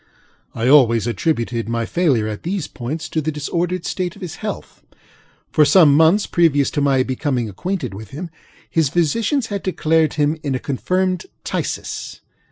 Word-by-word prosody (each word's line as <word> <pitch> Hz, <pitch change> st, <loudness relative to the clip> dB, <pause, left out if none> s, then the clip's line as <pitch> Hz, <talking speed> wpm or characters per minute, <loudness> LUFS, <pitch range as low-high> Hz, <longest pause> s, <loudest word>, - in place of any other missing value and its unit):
I 115 Hz, +1 st, -1 dB
always 120 Hz, -5 st, +5 dB
attributed 115 Hz, -, -1 dB
my 115 Hz, 0 st, -1 dB
failure 135 Hz, -9 st, +1 dB
at 105 Hz, -1 st, -5 dB
these 180 Hz, -2 st, -3 dB
points 145 Hz, +6 st, -5 dB
to 160 Hz, -, -1 dB
the 155 Hz, +1 st, -2 dB
disordered 170 Hz, +4 st, -2 dB
state 180 Hz, -2 st, -3 dB
of -, -, -11 dB
his 175 Hz, -, -6 dB
health. -, -, -6 dB, 0.7 s
For 155 Hz, -, +5 dB
some 150 Hz, -2 st, +6 dB
months 160 Hz, +7 st, +4 dB
previous 150 Hz, -5 st, +2 dB
to 145 Hz, -, -1 dB
my 135 Hz, -2 st, +3 dB
becoming 130 Hz, -2 st, -1 dB
acquainted 135 Hz, -, -4 dB
with 105 Hz, +1 st, -9 dB
him, 165 Hz, -, -7 dB, 0.4 s
his 160 Hz, -4 st, +1 dB
physicians 220 Hz, -, +1 dB
had 200 Hz, -, -2 dB
declared 160 Hz, -4 st, +1 dB
him 150 Hz, +1 st, +1 dB
in 140 Hz, -4 st, -2 dB
a -, -, -2 dB
confirmed 185 Hz, -, -1 dB, 0.2 s
phthisis. -, -, -4 dB
150 Hz, 165 wpm, -20 LUFS, 130-175 Hz, 0.7 s, some